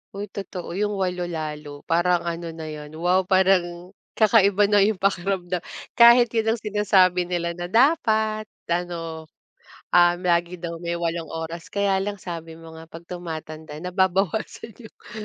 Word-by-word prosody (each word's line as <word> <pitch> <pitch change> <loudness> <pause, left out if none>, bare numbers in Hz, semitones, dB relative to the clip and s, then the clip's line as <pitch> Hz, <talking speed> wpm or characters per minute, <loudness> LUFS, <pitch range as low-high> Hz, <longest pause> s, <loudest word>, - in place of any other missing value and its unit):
Hoy 200 0 -6
totoo 190 -3 -7
'yong 205 +3 -1
8 180 -2 -2
lalo, 150 -3 -6
parang 175 +1 +1
ano 170 0 -4
na 160 - -8
'yon 150 0 -9
wow 180 +3 +1
parang 185 -2 +2 0.2
kakaiba 205 -2 +4
na 205 - +5
'yong 205 +1 +3
pakiramdam. 185 -2 -1 0.4
Kahit 235 0 +7
'yon 225 -1 +1
ang - - -10
sinasabi 190 -4 +2
nila 175 -1 -2
na 175 +1 -6
dapat, 220 - +2 0.2
ano, 165 -2 -3 0.7
um, 175 0 +5
lagi 175 0 0
daw 170 -1 -5
may 170 0 -4
8 170 -1 -3
oras. 165 +1 -6
Kaya 200 -1 +1
lang 205 -2 -5
sabi 165 -2 -7
mo 160 0 -12
nga 160 - -10
'pag 165 +1 -13
tumatanda 155 -3 -7
nababawasan 190 +4 -1
yong 225 -3 -15
180 Hz, 150 wpm, -23 LUFS, 170-200 Hz, 0.7 s, Kahit